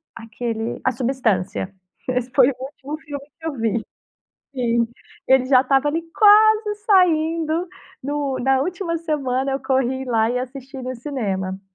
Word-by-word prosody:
aquele, 230 0 -4
A 255 - +2
Substância, 225 -7 -1 0.4
esse 250 0 -1
foi 260 -1 +6
o - - -2
último 285 +2 -7
filme 285 -1 -8
que 325 - -11
eu 315 - -2
vi 225 0 0 0.7
Sim. 235 -2 +1 0.4
Ele 265 -1 +5
já 255 -1 +6
estava 270 +2 +2
ali, 325 +3 -1
quase 430 0 +6
saindo, 330 -3 +2 0.3
no 280 -1 -2
na 265 +1 +2
última 350 0 -2
semana, 275 -4 -1
eu 270 - -2
corri 265 0 0
lá 225 -2 +2
e 250 - 0
assisti 265 +2 -7
no 255 0 -4
cinema. 195 -8 -3
265 Hz, 150 wpm, -21 LUFS, 245-305 Hz, 0.7 s, foi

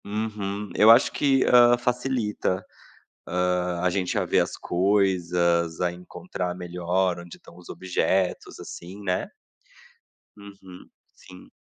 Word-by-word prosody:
Uhum. 105 -1 -4
Eu 110 - +6
acho 115 +4 +6
que, 135 -2 +2
hã, 120 0 +6
facilita, 120 -6 -2 0.9
hã, 90 -1 -2
a 90 - +2
gente 90 0 -1
a - - -1
ver - - +2
as - - -2
coisas, 90 -3 +1
a 90 -1 +1
encontrar 90 0 -6
melhor 90 0 -1
onde 85 0 -11
estão 85 - -17
os 90 - -14
objetos, 95 0 -1
assim, 95 +4 -10
né. 90 -2 -2 1.1
Uhum, 100 -3 -14 0.3
sim. 90 0 -16
95 Hz, 125 wpm, -25 LUFS, 90-105 Hz, 1.1 s, Eu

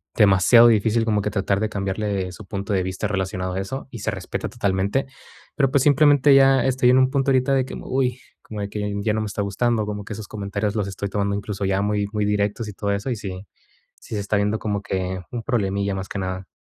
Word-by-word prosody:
demasiado 105 +3 +6
difícil 115 +1 +3
como 105 -2 +1
que 105 - -1
tratar 100 -1 0
de 110 - 0
cambiarle 100 -2 -2
su 105 - -11
punto 100 +1 -4
de 95 -2 +1
vista 95 +3 -3
relacionado 95 -2 -2
a 95 - -2
eso, 135 +9 -6
y 120 - -8
se 110 - -2
respeta 95 -3 -5
totalmente. 100 +2 0 0.5
Pero 135 -2 +2
pues 135 -2 +3
simplemente 145 -1 +5
ya 135 -1 +5
estoy 130 -1 +3
en 125 - +5
un 130 0 +4
punto 135 0 +1
ahorita 130 +1 +2
de, 130 -1 +2 0.2
uy, 130 -1 0
que - - -23 0.2
como 105 -2 -7
de 100 - -3
que 105 0 -3
ya 105 +1 0
no 110 - -1
me 110 - -3
está 105 - -3
gustando, 110 +2 0
como 105 -1 -5
que 105 - -6
sus 105 -1 -8
comentarios 100 0 -3
los 105 -3 -1
estoy 100 +1 -4
tomando 100 0 -1
incluso 100 0 -4
ya 95 0 +1
muy 105 0 0
muy 105 -1 0
directos 105 +2 -1
y 105 - -7
todo 100 +1 -2
eso, 100 +6 -2
y - - 0
sí 95 -1 -7 0.5
sí 110 - -7
se - - -1
está 100 +1 -1
viendo 105 +2 0
como 105 -2 -2
que 95 -1 -3
un 120 -2 -4
problemilla 100 -5 -1
más 95 0 -5
que 100 - -4
nada. 95 0 -4
105 Hz, 240 wpm, -22 LUFS, 100-115 Hz, 0.5 s, demasiado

